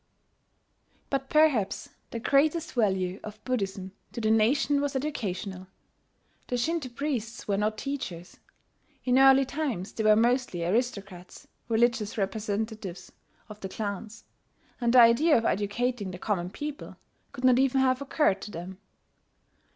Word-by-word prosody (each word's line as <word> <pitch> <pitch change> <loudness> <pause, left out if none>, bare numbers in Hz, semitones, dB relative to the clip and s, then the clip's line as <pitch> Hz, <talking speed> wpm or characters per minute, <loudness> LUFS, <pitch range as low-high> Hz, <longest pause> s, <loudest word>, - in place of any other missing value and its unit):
] - - -41
But 270 -1 -1
perhaps 300 -10 +2 0.2
the - - -5
greatest 305 +6 +2
value 190 -5 0
of 215 0 -10
Buddhism 195 -6 -2 0.2
to - - -5
the 220 -1 +1
nation 265 +6 +3
was 285 -1 -2
educational. 200 -9 -4 0.8
The 245 - -1
Shinto 310 +2 -1
priests 245 -3 -4
were 200 - +1
not 215 +1 0
teachers. 205 -12 -6 0.7
In 255 +1 +4
early 270 0 +7
times 260 - -3
they 220 - -3
were 215 0 +6
mostly 235 -6 +1
aristocrats, 200 -3 -3 0.2
religious 230 -1 +1
representatives 205 -2 -3 0.4
of 210 -2 -11
the 190 - -6
clans; 210 +2 -5 0.6
and 235 -1 +2
the 250 - +7
idea 240 +7 +5
of 230 - -1
educating 210 +1 -1
the 180 - -7
common 180 -3 -2
people 295 +8 -7 0.3
could 270 -2 -9
not 255 -1 +5
even 270 0 +3
have 260 0 +2
occurred 270 -8 +1
to - - -7
them. 185 +1 -8
225 Hz, 140 wpm, -28 LUFS, 200-265 Hz, 0.8 s, early